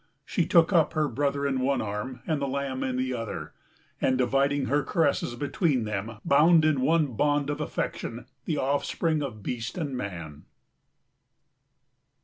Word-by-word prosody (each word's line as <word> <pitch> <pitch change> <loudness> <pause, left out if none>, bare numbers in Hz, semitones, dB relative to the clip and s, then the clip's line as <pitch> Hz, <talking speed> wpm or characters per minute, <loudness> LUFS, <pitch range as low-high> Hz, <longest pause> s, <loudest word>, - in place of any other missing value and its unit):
She 175 - 0
took 170 +2 +4
up 165 -3 +4
her 155 -1 +1
brother 140 +2 -1
in 135 -2 0
one 135 +2 +1
arm 110 +5 -4
and 155 -3 -1
the 140 - 0
lamb 135 -1 -2
in 130 -1 -1
the 130 0 -1
other, 115 -2 -5 0.5
and 130 -1 +2
dividing 135 +2 +2
her 145 +3 +2
caresses 145 -6 0
between 140 - 0
them 105 +1 -3
bound 155 +3 +5
in 150 -4 +2
one 155 -1 +2
bond 145 +3 +1
of 145 +1 -4
affection 120 -5 -4 0.2
the 155 - -1
offspring 150 +3 0
of 115 -8 -5
beast 120 - -4
and 145 -6 -3
man. 85 - -6
140 Hz, 155 wpm, -27 LUFS, 125-150 Hz, 0.5 s, bound